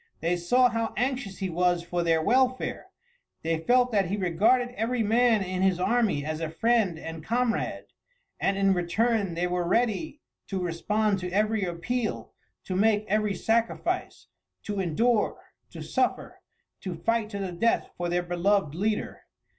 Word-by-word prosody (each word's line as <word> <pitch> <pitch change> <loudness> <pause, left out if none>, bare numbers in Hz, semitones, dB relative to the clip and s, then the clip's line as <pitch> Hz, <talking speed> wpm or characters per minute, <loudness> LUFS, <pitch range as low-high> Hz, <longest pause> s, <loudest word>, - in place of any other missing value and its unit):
They 170 +2 0
saw 245 +9 +3
how 230 -1 -2
anxious 250 -6 -2
he 190 -2 -3
was 175 0 +1
for 175 0 -2
their 165 -1 +2
welfare; 255 +5 +1 0.6
they 165 0 0
felt 245 +8 +3
that 200 -4 +2
he 200 +4 -2
regarded 210 +7 +2
every 230 +1 -1
man 225 -1 +3
in 185 0 -3
his 190 -2 +2
army 200 -8 +1
as 155 0 -3
a 160 - -2
friend 215 0 +1
and 160 0 -7
comrade, 235 +3 -1 0.5
and 195 0 +1
in 195 0 +3
return 195 +2 0
they 175 +1 0
were 180 0 -1
ready 245 - 0 0.3
to 195 - -3
respond 195 +4 0
to 180 0 -4
every 210 +1 +1
appeal, 215 +7 -3 0.3
to 185 - -4
make 210 +1 +2
every 210 -1 +1
sacrifice, 225 +5 -1 0.4
to 205 -2 -3
endure, 210 +6 +1 0.3
to - - -8
suffer, - - -1 0.4
to 185 -3 -5
fight 225 +5 0
to 200 - -5
the 195 -2 -3
death 230 +7 0
for 175 0 -3
their 175 +1 0
beloved 175 -1 +1
leader. 210 +5 -2
200 Hz, 160 wpm, -27 LUFS, 175-230 Hz, 0.6 s, saw